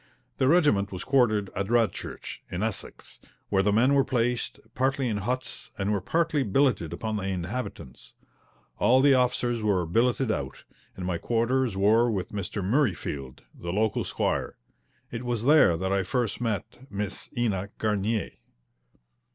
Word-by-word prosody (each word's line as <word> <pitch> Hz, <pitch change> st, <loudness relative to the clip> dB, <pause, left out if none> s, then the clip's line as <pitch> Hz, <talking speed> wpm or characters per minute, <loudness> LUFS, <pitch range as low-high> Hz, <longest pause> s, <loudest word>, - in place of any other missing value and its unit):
The 130 Hz, -, +2 dB
regiment 145 Hz, -, +3 dB
was 90 Hz, -1 st, -5 dB
quartered 110 Hz, -7 st, +2 dB
at 100 Hz, 0 st, -1 dB
Radchurch, 115 Hz, -3 st, -1 dB
in 90 Hz, +3 st, -3 dB
Essex, 110 Hz, -3 st, -6 dB, 0.3 s
where 95 Hz, -1 st, +3 dB
the 105 Hz, +1 st, +2 dB
men 120 Hz, +6 st, +4 dB
were 140 Hz, -1 st, +5 dB
placed 125 Hz, -2 st, -1 dB
partly 135 Hz, 0 st, 0 dB
in 110 Hz, -3 st, -1 dB
huts 125 Hz, +6 st, -3 dB
and 100 Hz, +1 st, -1 dB
were 100 Hz, -2 st, 0 dB
partly 165 Hz, -, +1 dB
billeted 125 Hz, -, +1 dB
upon 110 Hz, +5 st, -3 dB
the 95 Hz, -2 st, -3 dB
inhabitants. 90 Hz, -, -5 dB, 0.6 s
All 120 Hz, +5 st, +5 dB
the 140 Hz, 0 st, +6 dB
officers 125 Hz, -2 st, +1 dB
were 100 Hz, -5 st, +1 dB
billeted 120 Hz, +7 st, +1 dB
out, 70 Hz, -9 st, -4 dB, 0.3 s
and 90 Hz, -, -6 dB
my 90 Hz, -2 st, -1 dB
quarters 120 Hz, +1 st, 0 dB
were 110 Hz, +5 st, +4 dB
with 95 Hz, -5 st, -2 dB
Mr. 100 Hz, 0 st, -4 dB
Murreyfield, 95 Hz, -, -1 dB
the 85 Hz, -, -6 dB
local 110 Hz, +3 st, +1 dB
squire. -, -, -2 dB, 0.5 s
It 115 Hz, +1 st, -5 dB
was 120 Hz, -2 st, -2 dB
there 145 Hz, -, +6 dB
that 95 Hz, +2 st, -1 dB
I 100 Hz, -, +2 dB
first 120 Hz, +5 st, -2 dB
met 115 Hz, +3 st, -3 dB
Miss 100 Hz, -1 st, -4 dB
Ena 100 Hz, -5 st, 0 dB
Garnier. 105 Hz, 0 st, 0 dB
110 Hz, 150 wpm, -27 LUFS, 95-125 Hz, 0.6 s, the